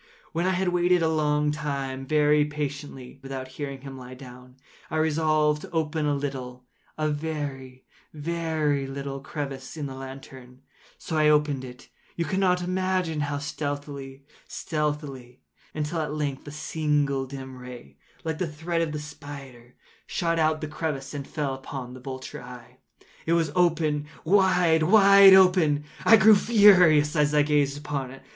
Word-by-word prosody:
When 170 +2 -1
I 190 - +2
had 185 0 0
waited 175 0 +2
a - - +3
long 150 -1 +1
time, 140 -3 -4
very 150 0 +3
patiently, 145 -3 -6
without 135 -1 -6
hearing 140 0 -6
him 135 -1 -9
lie 125 0 -10
down, 125 -1 -13 0.3
I 160 - -2
resolved 155 -1 +2
to - - -9
open 155 -2 -1
a 145 - +1
little—a 130 +2 -6
very, 145 -4 -5 0.3
very 155 -3 -1
little 135 0 -5
crevice 140 0 -6
in 150 - -3
the 135 - -6
lantern. 130 -1 -11 0.3
So 160 - -5
I 155 0 +4
opened 150 -3 +2
it—you 125 +6 -8
cannot 180 0 +1
imagine 185 -3 -1
how 145 0 -2
stealthily, 145 -2 -5 0.2
stealthily—until, 150 - -5
at 150 -1 -3
length 145 -2 -3
a - - -6
simple 150 -3 -1
dim 130 -1 -8
ray, 120 - -11 0.3
like 160 -2 -3
the 170 -4 -2
thread 165 +3 -2
of 160 -2 -2
the 150 - -3
spider, 140 -5 -11 0.3
shot 165 -1 -1
from 160 - +4
out 155 0 0
the 155 - -3
crevice 150 -3 -4
and 140 -2 -6
fell 150 -2 -3
full 135 - -4
upon 130 -2 -7
the 130 - -10
vulture 130 +2 -7
eye. 125 -1 -12 0.5
It 165 - +3
was 165 -3 +1
open—wide, 165 +1 +2
wide 195 +2 +8
open—and 180 -6 +4 0.2
I 225 - +8
grew 220 0 +7
furious 185 -9 +5
as 150 -1 +2
I 150 - +5
gazed 145 -1 +1
upon 145 -3 -4
it. 135 +1 -13
150 Hz, 155 wpm, -26 LUFS, 135-160 Hz, 0.5 s, wide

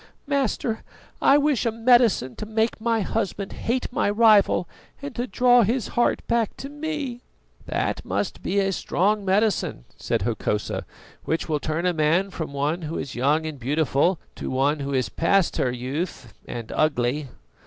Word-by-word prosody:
"Master, 265 -5 -1 0.4
I 280 - +6
wish 290 -4 +2
a 230 - +1
medicine 230 - +3
to 215 - -6
make 220 0 0
my 230 -1 +1
husband 200 -1 -2
hate 250 +1 -2
my 205 - +1
rival 210 -4 +4 0.3
and 285 -1 -6
to 245 +1 -3
draw 245 0 +5
his 230 +2 0
heart 240 - +1
back 235 -3 0
to 275 - -7
me." 295 -4 -4 0.5
"That - - -1
must - - -3
be 200 - -2
a 195 -1 +2
strong 200 +3 0
medicine," 195 - +1
said - - -1
Hokosa, 110 -1 -2 0.4
"which 160 - -1
will 155 -2 0
turn 155 +4 -2
a 180 - +2
man 165 +5 +2
from 160 -5 -5
one 145 +5 -1
who 160 +1 -4
is 135 - -5
young 145 +6 +1
and 155 -3 -5
beautiful 145 +6 +1 0.2
to - - -4
one 140 +3 +1
who 140 0 -3
is 130 -2 +1
past 185 +2 +2
her 125 - +1
youth 130 +1 -4
and 115 -2 -6
ugly." 140 -1 +1
195 Hz, 165 wpm, -24 LUFS, 150-230 Hz, 0.5 s, I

